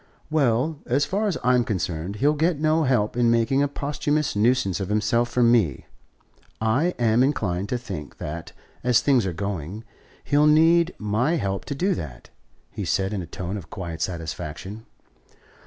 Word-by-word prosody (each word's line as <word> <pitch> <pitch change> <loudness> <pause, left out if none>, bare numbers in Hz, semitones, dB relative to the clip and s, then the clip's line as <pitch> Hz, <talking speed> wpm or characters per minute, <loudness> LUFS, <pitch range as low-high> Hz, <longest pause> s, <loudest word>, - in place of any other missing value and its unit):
"Well, 145 +1 +1
as 135 +4 +2
far 210 +3 -1
as 190 - -1
I'm 125 0 +4
concerned, 90 -3 -3
he'll 145 +8 +2
get 160 +1 +1
no 155 +1 +2
help 120 -6 +1
in 120 -1 +3
making 115 +4 +2
a 145 - +3
posthumous 145 0 -1
nuisance 105 -3 +2
of 95 -1 -4
himself 110 +3 +1
from 120 -1 +3
me; 100 - +2 0.7
and 130 +11 +1
I'm 115 0 +3
inclined 100 -9 0
to 125 - 0
think 95 -12 -7
that, 80 +2 -6 0.3
as 125 -2 +4
things 130 -8 +3
are - - -1
going, 100 +2 -5 0.4
he'll 150 +1 +3
need 165 +3 +4
my 110 +10 0
help 100 - -2
to 140 - -4
do 190 +7 +1
that," 70 - -8 0.4
he - - -5
said 95 +2 0
in 100 - -2
a 85 - -7
tone 90 +3 -5
of 90 -4 -9
quiet 85 -3 -6
satisfaction. 90 +4 -5
115 Hz, 170 wpm, -24 LUFS, 95-145 Hz, 0.7 s, I'm